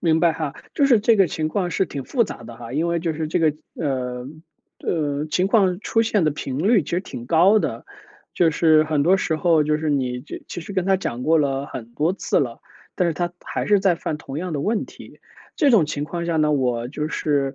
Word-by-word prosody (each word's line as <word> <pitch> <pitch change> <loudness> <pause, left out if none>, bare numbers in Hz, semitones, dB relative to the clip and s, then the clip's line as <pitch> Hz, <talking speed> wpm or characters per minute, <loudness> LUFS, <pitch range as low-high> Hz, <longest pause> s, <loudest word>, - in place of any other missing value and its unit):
明 160 -2 +2
白 170 -2 +4
哈， 155 -3 -4 0.2
就 280 - +3
是 240 -6 +5
这 225 +1 +4
个 195 -2 +5
情 155 +1 -2
况 180 +1 -1
是 190 - 0
挺 140 -2 -6
复 240 -4 +1
杂 120 - -8
的 115 0 -10
哈。 120 0 -9
因 160 +4 0
为 170 0 +1
就 165 -1 -1
是 155 0 -3
这 - - 0
个， 160 -2 +3 0.2
呃， 125 -4 -3 0.5
呃， 150 -2 -1
情 180 +4 +1
况 195 -3 +2
出 225 +1 +1
现 210 -6 +1
的 155 - +3
频 135 -2 -5
率 200 +2 +3
其 - - -9
实 175 - 0
挺 120 -10 -9
高 185 +8 +5
的， - - -3 0.5
就 170 -2 +3
是 155 0 +4
很 150 -2 +1
多 185 +5 +4
时 160 -4 -1
候 160 -2 +3
就 150 0 +1
是 155 -1 -2
你 125 -3 -1
就 - - -8
其 175 - -5
实 200 - -8
跟 185 -2 0
他 195 0 +3
讲 125 -9 -4
过 160 +2 +3
了 140 -1 0
很 115 -6 -7
多 160 +5 +1
次 195 - 0
了， 120 -4 -3 0.3
但 180 -2 +1
是 160 - -1
他 175 +2 -2
还 - - -4
是 205 -2 +4
在 190 -3 +3
犯 155 -2 -4
同 140 -1 -7
样 180 -1 -4
的 145 - -2
问 215 +6 0
题。 - - -14 0.4
这 290 -6 +4
种 195 -10 +5
情 145 -1 -3
况 170 +2 -4
下 165 -1 0
呢， 150 -1 +3
我 125 -3 0
就 150 +2 -3
是 140 -4 0
160 Hz, 265 characters per minute, -22 LUFS, 145-180 Hz, 0.5 s, 是